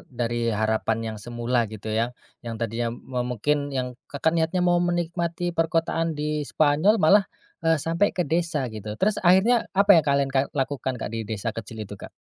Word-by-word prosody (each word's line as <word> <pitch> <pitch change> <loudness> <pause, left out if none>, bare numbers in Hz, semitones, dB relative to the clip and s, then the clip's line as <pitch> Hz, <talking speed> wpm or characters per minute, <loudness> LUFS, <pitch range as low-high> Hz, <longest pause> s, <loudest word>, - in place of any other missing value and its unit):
dari 120 -1 -2 0.2
harapan 110 +1 +1
yang 110 - -7
semula 120 0 -1
gitu 110 0 -6
ya, 115 +2 +1 0.3
yang 115 -2 -6
tadinya 115 +1 -2
me 125 +2 -5
mungkin 140 +4 -1
yang 125 -1 -2 0.2
Kakak 150 +3 0
niatnya 170 +2 +1
mau 175 0 +3
menikmati 175 0 -1
perkotaan 165 -1 0
di 150 -1 -2
Spanyol 155 +8 +3
malah, 195 +3 +4 0.3
eee, 165 0 +3
sampai 165 +6 +1
ke 180 - +1
desa 165 -2 0
gitu. 105 0 -6
Terus 205 - +1
akhirnya 195 +7 +4
apa 200 +1 +4
yang - - -11
kalian 140 -1 +2
ka 135 - +3 0.2
lakukan 135 -2 -1
Kak, 115 - -5
di 115 -2 -4
desa 110 +1 -3
kecil 110 0 -7
itu, 100 - -11
Kak? - - -8
145 Hz, 180 wpm, -25 LUFS, 115-170 Hz, 0.3 s, malah